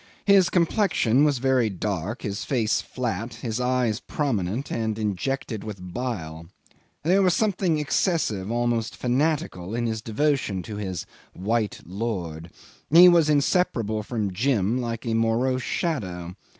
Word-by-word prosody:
His 195 Hz, -3 st, +5 dB
complexion 170 Hz, -, +2 dB
was 145 Hz, -3 st, +3 dB
very 130 Hz, -2 st, +2 dB
dark, 100 Hz, +2 st, -3 dB
his 100 Hz, -2 st, -3 dB
face 115 Hz, -6 st, +1 dB
flat, 115 Hz, -2 st, -4 dB
his 115 Hz, -1 st, -4 dB
eyes 125 Hz, -3 st, +1 dB
prominent 120 Hz, -5 st, -2 dB
and 110 Hz, -2 st, -1 dB
injected 110 Hz, +2 st, -2 dB
with 90 Hz, -4 st, -8 dB
bile. 85 Hz, -11 st, -4 dB, 0.6 s
There 185 Hz, +5 st, +4 dB
was 185 Hz, -3 st, +3 dB
something 190 Hz, -6 st, +1 dB
excessive, 150 Hz, -, 0 dB
almost 120 Hz, -1 st, 0 dB
fanatical, 125 Hz, -, -1 dB
in 120 Hz, 0 st, -1 dB
his 110 Hz, -1 st, -2 dB
devotion 115 Hz, -5 st, 0 dB
to 105 Hz, +3 st, -7 dB
his 95 Hz, -4 st, -4 dB, 0.3 s
"white 105 Hz, +2 st, -1 dB
lord." 90 Hz, -5 st, -4 dB, 0.4 s
He 175 Hz, +4 st, +9 dB
was 170 Hz, -3 st, +4 dB
inseparable 140 Hz, -, +1 dB
from 105 Hz, -3 st, -3 dB
Jim 115 Hz, +1 st, +1 dB
like 115 Hz, -1 st, -4 dB
a 115 Hz, -, -1 dB
morose 115 Hz, +3 st, +1 dB
shadow. 90 Hz, -, -3 dB
115 Hz, 135 wpm, -25 LUFS, 105-140 Hz, 0.6 s, He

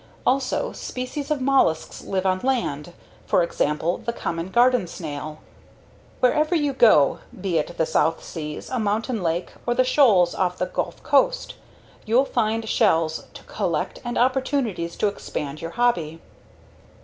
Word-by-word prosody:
Also, 270 Hz, -, +1 dB
species 265 Hz, +3 st, -5 dB
of 300 Hz, -3 st, 0 dB
mollusks 255 Hz, -12 st, +1 dB
live 190 Hz, -1 st, -2 dB
on 185 Hz, 0 st, +2 dB
land 175 Hz, -, -2 dB, 0.3 s
for 180 Hz, -, +3 dB
example 160 Hz, 0 st, -1 dB
the 235 Hz, -, -3 dB
common 170 Hz, -6 st, -4 dB
garden 245 Hz, -2 st, +3 dB
snail. 155 Hz, -2 st, -7 dB, 0.8 s
Wherever 305 Hz, +7 st, +3 dB
you 290 Hz, -3 st, +1 dB
go, 215 Hz, -, +5 dB, 0.2 s
be 180 Hz, -4 st, 0 dB
it 170 Hz, +3 st, -5 dB
the 160 Hz, -, +2 dB
South 160 Hz, +1 st, +1 dB
Seas, 150 Hz, -2 st, -7 dB
a 255 Hz, -, -1 dB
mountain 220 Hz, +2 st, -1 dB
lake, 170 Hz, +1 st, -1 dB, 0.2 s
or 240 Hz, -, +1 dB
the 255 Hz, -, +4 dB
shoals 220 Hz, -10 st, +4 dB
off 180 Hz, -1 st, -1 dB
the 180 Hz, -, 0 dB
Gulf -, -, -4 dB
Coast, -, -, +2 dB, 0.5 s
you'll 240 Hz, +5 st, +3 dB
find 225 Hz, -3 st, -1 dB
shells 165 Hz, -9 st, +1 dB
to -, -, -11 dB
collect 175 Hz, -7 st, -2 dB
and 240 Hz, -1 st, -3 dB
opportunities 250 Hz, -9 st, 0 dB
to -, -, 0 dB
expand 150 Hz, -7 st, -5 dB
your 165 Hz, -, -4 dB
hobby. 170 Hz, -10 st, +1 dB
205 Hz, 150 wpm, -23 LUFS, 165-255 Hz, 0.8 s, go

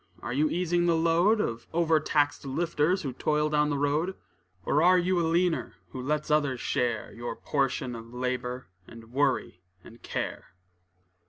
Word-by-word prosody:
Are 120 Hz, -, -3 dB
you 150 Hz, +4 st, +2 dB
easing 175 Hz, 0 st, +1 dB
the 170 Hz, -, +4 dB
load, 170 Hz, +7 st, +3 dB
Of 115 Hz, -, -2 dB
overtaxed 155 Hz, -3 st, +2 dB
lifters, 165 Hz, +5 st, 0 dB
who 135 Hz, -3 st, -3 dB
toil 150 Hz, +3 st, 0 dB
down 150 Hz, 0 st, +2 dB
the 145 Hz, -, 0 dB
road? 150 Hz, +6 st, 0 dB, 0.5 s
Or 150 Hz, -, +2 dB
are 180 Hz, +2 st, +6 dB
you 180 Hz, 0 st, +1 dB
a 165 Hz, -, +1 dB
leaner, 170 Hz, +1 st, +1 dB, 0.2 s
who 130 Hz, -, -6 dB
lets 150 Hz, +3 st, -1 dB
others 145 Hz, -4 st, +2 dB
share 120 Hz, -3 st, -1 dB
Your 120 Hz, -1 st, -5 dB
portion 135 Hz, -2 st, -1 dB
of 115 Hz, 0 st, -10 dB
labor, 125 Hz, 0 st, -3 dB, 0.2 s
and 115 Hz, 0 st, -13 dB
worry 130 Hz, -9 st, 0 dB, 0.2 s
and 115 Hz, +1 st, -15 dB
care? -, -, -5 dB
150 Hz, 160 wpm, -28 LUFS, 125-165 Hz, 0.5 s, are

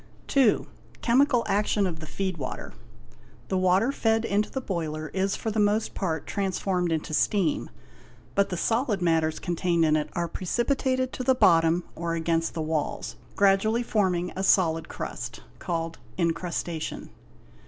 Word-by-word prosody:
B. 265 Hz, -6 st, +5 dB, 0.5 s
Chemical 250 Hz, 0 st, +4 dB
action 205 Hz, 0 st, +2 dB
of 170 Hz, -4 st, -3 dB
the 155 Hz, -, -8 dB
feed 190 Hz, 0 st, -3 dB
water. 130 Hz, -4 st, -6 dB, 0.8 s
The 190 Hz, -, +1 dB
water 185 Hz, +7 st, +3 dB
fed 225 Hz, -4 st, +1 dB
into 205 Hz, +1 st, +1 dB
the 265 Hz, -, -3 dB
boiler 155 Hz, -8 st, -3 dB
is 195 Hz, +1 st, 0 dB
for 220 Hz, -, -3 dB
the 215 Hz, -, -1 dB
most 210 Hz, +1 st, +2 dB
part 160 Hz, -6 st, -2 dB
transformed 190 Hz, -3 st, -1 dB
into 160 Hz, -1 st, -2 dB
steam, 180 Hz, -1 st, +1 dB, 0.6 s
but 200 Hz, 0 st, +2 dB
the 180 Hz, -, -3 dB
solid 225 Hz, 0 st, +1 dB
matters 160 Hz, -3 st, +1 dB
con 175 Hz, -, -3 dB
_ -, -, -11 dB
tained 170 Hz, -2 st, +2 dB
in 155 Hz, -1 st, +3 dB
it 150 Hz, 0 st, -1 dB
are 170 Hz, 0 st, -1 dB
precipitated 255 Hz, +8 st, 0 dB
to 255 Hz, -, -4 dB
the 260 Hz, +1 st, +3 dB
bottom 165 Hz, -5 st, +4 dB
or 165 Hz, 0 st, -2 dB
against 165 Hz, 0 st, 0 dB
the 160 Hz, -, -1 dB
walls, 155 Hz, -, -2 dB, 0.2 s
gradually 200 Hz, +4 st, +3 dB
forming 185 Hz, -6 st, 0 dB
a 190 Hz, -, -2 dB
solid 165 Hz, -4 st, +3 dB
crust, -, -, -6 dB, 0.2 s
called 165 Hz, -1 st, -3 dB, 0.2 s
incrustation. 170 Hz, -1 st, -2 dB
185 Hz, 155 wpm, -26 LUFS, 165-210 Hz, 0.8 s, B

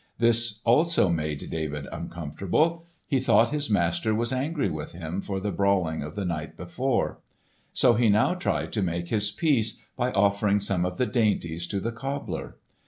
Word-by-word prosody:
This 115 Hz, -2 st, +1 dB
also 150 Hz, -, +4 dB
made 75 Hz, -3 st, -2 dB
David 75 Hz, -3 st, -3 dB
uncomfortable. 95 Hz, -, -1 dB, 0.2 s
He 135 Hz, -4 st, +2 dB
thought 130 Hz, -, +4 dB
his 150 Hz, -3 st, -1 dB
master 100 Hz, +3 st, +1 dB
was 120 Hz, +3 st, 0 dB
angry 145 Hz, +4 st, 0 dB
with 75 Hz, -1 st, -5 dB
him 85 Hz, +2 st, -4 dB
for 95 Hz, -1 st, -3 dB
the 100 Hz, +1 st, -2 dB
brawling 95 Hz, -6 st, +1 dB
of 75 Hz, +2 st, -6 dB
the 100 Hz, -, -2 dB
night 80 Hz, -3 st, -4 dB
before; 120 Hz, +9 st, -1 dB, 0.5 s
so 120 Hz, -, +4 dB
he 115 Hz, 0 st, +3 dB
now 105 Hz, +10 st, +4 dB
tried 180 Hz, -, -2 dB
to 105 Hz, -, 0 dB
make 85 Hz, -1 st, -2 dB
his 105 Hz, -2 st, +1 dB
peace 125 Hz, -9 st, +1 dB, 0.2 s
by 125 Hz, 0 st, 0 dB
offering 100 Hz, +1 st, +3 dB
some 95 Hz, -3 st, 0 dB
of 90 Hz, 0 st, -3 dB
the 125 Hz, -, +2 dB
dainties 100 Hz, -8 st, 0 dB
to 100 Hz, -, -2 dB
the 115 Hz, +4 st, -2 dB
cobbler. 135 Hz, +4 st, -5 dB
105 Hz, 170 wpm, -26 LUFS, 85-120 Hz, 0.5 s, also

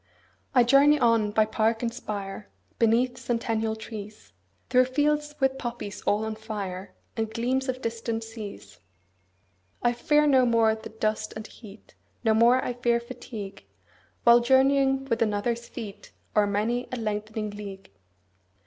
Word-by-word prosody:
20 260 Hz, -, +5 dB
I 240 Hz, -, +5 dB
journey 285 Hz, +3 st, +6 dB
on 230 Hz, -4 st, +3 dB
by 215 Hz, +1 st, +3 dB
park 225 Hz, +1 st, 0 dB
and 230 Hz, -1 st, -1 dB
spire, 205 Hz, -3 st, -6 dB, 0.3 s
Beneath 235 Hz, +2 st, +2 dB
centennial 225 Hz, -2 st, -1 dB
trees, 215 Hz, -1 st, -9 dB, 0.4 s
Through 255 Hz, 0 st, +5 dB
fields 295 Hz, +3 st, 0 dB
with 265 Hz, -1 st, +1 dB
poppies 235 Hz, -5 st, -5 dB
all 210 Hz, +2 st, +2 dB
on 220 Hz, -, -3 dB
fire, 205 Hz, -4 st, -6 dB, 0.2 s
And 220 Hz, -2 st, -2 dB
gleams 255 Hz, +4 st, -1 dB
of 255 Hz, 0 st, -3 dB
distant 230 Hz, 0 st, -3 dB
seas. 215 Hz, -, -9 dB, 1.0 s
I 240 Hz, 0 st, +3 dB
fear 295 Hz, +5 st, +3 dB
no 260 Hz, -4 st, +5 dB
more 230 Hz, -2 st, +4 dB
the 220 Hz, 0 st, -8 dB
dust 215 Hz, -1 st, -2 dB
and 215 Hz, 0 st, -6 dB
heat, 215 Hz, -2 st, -14 dB, 0.3 s
25 -, -, -23 dB
No 220 Hz, -, +5 dB
more 235 Hz, +3 st, +4 dB
I 245 Hz, -, -1 dB
fear 240 Hz, -1 st, +1 dB
fatigue, 235 Hz, -4 st, -8 dB, 0.6 s
While 235 Hz, 0 st, +7 dB
journeying 270 Hz, +2 st, +3 dB
with 230 Hz, -4 st, -1 dB
another's 230 Hz, +2 st, 0 dB
feet 210 Hz, -4 st, -9 dB, 0.2 s
O'er 210 Hz, -1 st, +4 dB
many 225 Hz, +5 st, -1 dB
a -, -, -2 dB
lengthening 215 Hz, -1 st, -3 dB
league. 200 Hz, -, -9 dB
230 Hz, 150 wpm, -26 LUFS, 215-250 Hz, 1.0 s, While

